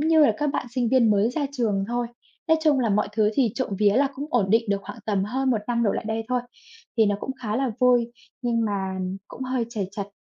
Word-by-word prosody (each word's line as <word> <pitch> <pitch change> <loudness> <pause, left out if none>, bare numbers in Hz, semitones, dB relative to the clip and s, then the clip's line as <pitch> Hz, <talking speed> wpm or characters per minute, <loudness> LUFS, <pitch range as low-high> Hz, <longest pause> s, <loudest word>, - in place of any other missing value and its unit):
như 315 +1 +4
là - - +3
các 295 - 0
bạn - - -2
sinh 245 -2 0
viên 235 -3 +4
mới 205 +3 +3
ra 285 +2 -1
trường 215 -7 0
thôi. 240 0 -1 0.4
Nói 320 - +6
chung 295 -4 +4
là 235 - +1
mọi 205 +1 +1
thứ 215 -1 +2
thì 245 -6 +2
trộm 260 - -2
vía 205 -1 +4
là 275 0 +4
cũng 280 +3 -5
ổn 205 -6 +1
định 225 +2 +4
được 200 - +2
khoảng 235 - -9
tầm 200 -3 +1
hơn 260 +5 0
1 230 - +2
năm 235 -1 0
đổ 210 - +3
lại - - -3
đây 220 +1 -2
thôi. 250 0 +1 0.6
Thì 220 - +5
nó 205 0 +1
cũng - - -4
khá 215 -1 -1
là 265 -1 0
vui, 245 -2 +4 0.3
nhưng 235 -2 +1
mà 190 -3 -2 0.3
cũng - - -8
hơi 255 -2 -1
trầy 205 -5 -3
trật. 200 -1 -5
235 Hz, 260 wpm, -24 LUFS, 210-255 Hz, 0.6 s, Nói